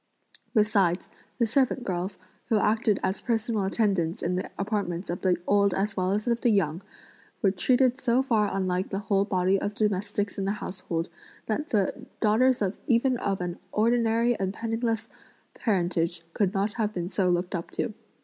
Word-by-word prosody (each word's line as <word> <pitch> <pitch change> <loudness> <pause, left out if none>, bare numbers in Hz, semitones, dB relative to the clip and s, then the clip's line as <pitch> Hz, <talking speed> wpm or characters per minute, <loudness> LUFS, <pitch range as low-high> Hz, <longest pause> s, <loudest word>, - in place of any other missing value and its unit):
Besides, 200 -5 +2 0.3
the 235 - +3
servant 255 +2 +1
girls, 185 -1 -3 0.3
who 220 - +4
acted 210 -1 +2
as 190 +1 -1
personal 225 -3 0
attendants 195 -5 0
in 180 +1 0
the 185 - -3
apartments 195 -4 -2
of 175 - -4
the 185 -2 +2
old 200 -2 +3
as 200 +2 -1
well 185 0 0
as 210 +2 0
of 235 -1 0
the 240 - +3
young, 180 -5 +1 0.6
were 195 - +5
treated 255 +6 +2
so 250 +1 +3
far 220 -6 +2
unlike 185 -1 -1
the 195 - -2
whole 200 -1 +1
body 190 -1 +1
of 205 0 -2
domestics 205 0 -1
in 195 - -1
the 195 - +1
household 180 -5 -4 0.4
that 295 +9 -2
the 220 +5 0
daughters 235 +2 +3 0.2
even 250 0 +3
of 195 -4 -1
an 175 -1 -4
ordinary 230 +1 +2
and 190 0 -2
penniless 225 -1 -1 0.5
parentage 175 -5 0
could 200 -3 +1
not 200 +1 0
have 215 -1 -1
been 175 -1 -2
so 190 -1 +1
looked 175 0 0
up 170 -2 -3
to. 220 - -3
205 Hz, 170 wpm, -27 LUFS, 185-225 Hz, 0.6 s, were